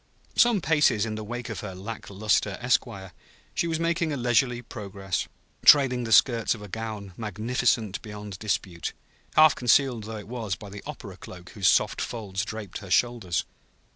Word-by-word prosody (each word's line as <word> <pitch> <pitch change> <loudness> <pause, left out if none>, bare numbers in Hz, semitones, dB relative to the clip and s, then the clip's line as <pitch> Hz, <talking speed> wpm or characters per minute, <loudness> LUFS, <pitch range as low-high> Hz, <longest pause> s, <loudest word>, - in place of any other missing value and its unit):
Some 235 -5 +4
paces 150 -10 +3
in 110 - -3
the 110 0 -5
wake 120 +2 -5
of 115 - -4
her 95 -3 -6
lack 105 +4 -7
luster 100 0 +1
esquire, 115 -6 -1 0.4
she 170 - 0
was 165 -1 -1
making 165 -1 0
a 145 - -2
leisurely 120 0 +1
progress, 100 -4 -4 0.4
trailing 130 -4 +6
the 115 - -5
skirts 115 0 +4
of 105 - -11
a - - -8
gown 105 -2 -6
magnificent 110 -1 0
beyond 105 -3 -8
dispute, 95 -4 -2 0.4
half 155 -1 +7
concealed 125 -2 +2
though 110 0 -6
it 105 - -9
was 115 -5 -3
by 100 +4 -11
the 100 0 -8
opera - - -8
cloak 90 -1 -11
whose 100 -3 0
soft - - +3
folds 100 -5 -3
draped 105 -3 -6
her 100 - -11
shoulders. 110 -6 +1
110 Hz, 170 wpm, -26 LUFS, 100-120 Hz, 0.4 s, half